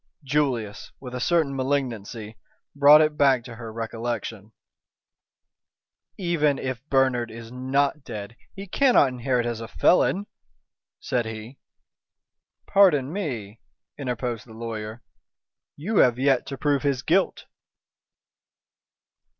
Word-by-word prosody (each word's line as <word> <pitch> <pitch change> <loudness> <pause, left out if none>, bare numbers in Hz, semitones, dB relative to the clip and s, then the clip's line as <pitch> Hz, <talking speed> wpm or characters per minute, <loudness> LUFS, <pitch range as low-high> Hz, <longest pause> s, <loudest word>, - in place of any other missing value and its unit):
Julius, 130 -7 -1
with 125 -2 -9
a 125 - -3
certain 155 0 +1
malignancy, 120 -5 -3 0.4
brought 145 +2 +8
it 155 -1 +1
back 135 -4 +4
to 115 -2 -10
her 115 -1 -7
recollection. 115 -2 -5 1.7
"Even 165 -6 +1
if 130 -2 -4
Bernard 130 -3 +2
is 115 0 -10
not 135 +3 0
dead 105 -2 -7 0.2
he 195 0 -7
cannot 245 - +4
inherit 125 -1 -1
as 120 -1 -3
a 115 - -6
felon," 185 - +2 0.7
said 120 -3 -1
he. 110 +4 -8 1.1
"Pardon 160 -8 +4
me," 120 - -4 0.4
interposed 125 -4 -4
the 110 - -13
lawyer. 110 0 -6 0.7
"You 195 +9 -2
have 125 -2 +5
yet 135 -1 +2
to 135 - -5
prove 145 -1 +1
his 140 -3 0
guilt." 185 +4 +1
130 Hz, 115 wpm, -25 LUFS, 115-145 Hz, 1.7 s, brought